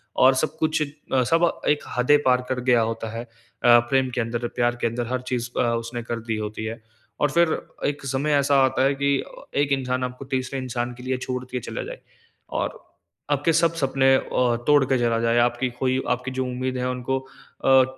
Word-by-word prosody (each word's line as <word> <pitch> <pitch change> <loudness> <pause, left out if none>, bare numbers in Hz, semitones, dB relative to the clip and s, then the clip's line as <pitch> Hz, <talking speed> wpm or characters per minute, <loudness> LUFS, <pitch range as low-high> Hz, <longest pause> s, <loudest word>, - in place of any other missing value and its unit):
और 130 +1 +6
सब 155 +3 -1
कुछ 160 -1 +1
अ, 140 -3 -1
सब 165 +5 +3 0.2
एक 150 - +2
हदें 135 +4 +5
पार 125 -1 +4
कर 130 - -1
गया 120 -2 +5
होता 115 0 -5
है, 120 - -4
अ, 120 0 +2
प्रेम 135 0 +2
के 125 - +1
अंदर, 120 +1 -2
प्यार 120 0 +1
के - - +2
अंदर 120 +1 -3
हर 130 +1 -2
चीज़ 120 -1 -1
अ, - - +4
उसने 115 +1 -4
कर 120 0 -4
दी 110 - 0
होती 105 0 -4
है। 115 +1 -5 0.4
और 145 - +3
फ़िर 170 +1 +4 0.4
एक 145 -1 -3
समय 140 +3 0
ऐसा 140 0 +3
आता 130 0 +2
है 140 +1 +3
कि 140 +1 -1 0.5
एक 145 - 0
इंसान 130 -2 0
आपको 125 +2 -5
तीसरे 130 +1 -1
इंसान 120 -1 -3
के 125 +1 -12
लिए 130 0 -1
छोड़ 125 0 -4
के 125 - -2
चला - - -5
जाए, - - -8 0.5
और - - -3 0.5
आपके 145 +4 +2
सब 165 0 +3
सपने 135 -3 +3
अ, - - +3 0.5
तोड़ 145 -2 +6
के 130 0 +2
चला 115 -1 +1
जाए, 115 +1 +2
आपकी 120 +2 +1
खोई 130 0 +1
आपकी 125 +1 -1
जो 130 0 -1
उम्मीदें 130 0 -3
है 125 - 0
उनको 125 +1 -1
अ, 130 0 +1
130 Hz, 210 wpm, -24 LUFS, 120-135 Hz, 0.5 s, और